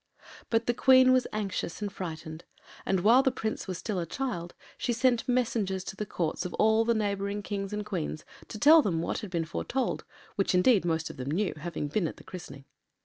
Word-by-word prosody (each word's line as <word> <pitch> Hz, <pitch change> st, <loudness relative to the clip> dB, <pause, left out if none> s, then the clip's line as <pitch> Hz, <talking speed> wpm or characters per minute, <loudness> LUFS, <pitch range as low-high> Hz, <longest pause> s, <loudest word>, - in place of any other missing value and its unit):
But 225 Hz, 0 st, +1 dB
the 240 Hz, -, +2 dB
Queen 255 Hz, +1 st, +6 dB
was 255 Hz, -1 st, +2 dB
anxious 200 Hz, -5 st, -3 dB
and 205 Hz, -1 st, -4 dB
frightened, 160 Hz, -2 st, -6 dB, 0.4 s
and 190 Hz, -2 st, +2 dB
while 235 Hz, +7 st, +6 dB
the 270 Hz, -, +3 dB
Prince 220 Hz, -5 st, -4 dB
was 185 Hz, -2 st, -3 dB
still 205 Hz, -1 st, -3 dB
a 170 Hz, -, -2 dB
child 175 Hz, -, -4 dB, 0.2 s
she 240 Hz, -, -1 dB
sent 240 Hz, 0 st, +1 dB
messengers 220 Hz, -6 st, 0 dB
to 190 Hz, -, -7 dB
the 210 Hz, +1 st, -4 dB
Courts 170 Hz, -1 st, -2 dB
of 180 Hz, -, -5 dB
all 220 Hz, +1 st, +4 dB
the 230 Hz, 0 st, +2 dB
neighbouring 200 Hz, -1 st, -1 dB
Kings 195 Hz, -1 st, -4 dB
and 210 Hz, 0 st, -3 dB
Queens 175 Hz, -6 st, -4 dB, 0.2 s
to -, -, -7 dB
tell 310 Hz, +7 st, +7 dB
them 165 Hz, -, -1 dB
what -, -, -2 dB
had 210 Hz, -, -7 dB
been 170 Hz, -2 st, -1 dB
foretold, 250 Hz, +10 st, -2 dB, 0.3 s
which, 195 Hz, -2 st, +1 dB
indeed, 190 Hz, +1 st, +4 dB
most 165 Hz, -1 st, -1 dB
of -, -, -15 dB
them 130 Hz, +1 st, -4 dB
knew, 190 Hz, +6 st, 0 dB
having 155 Hz, -1 st, -4 dB
been 170 Hz, +3 st, 0 dB
at -, -, -7 dB
the -, -, -14 dB
christening. 140 Hz, -7 st, -10 dB
200 Hz, 210 wpm, -29 LUFS, 175-230 Hz, 0.4 s, tell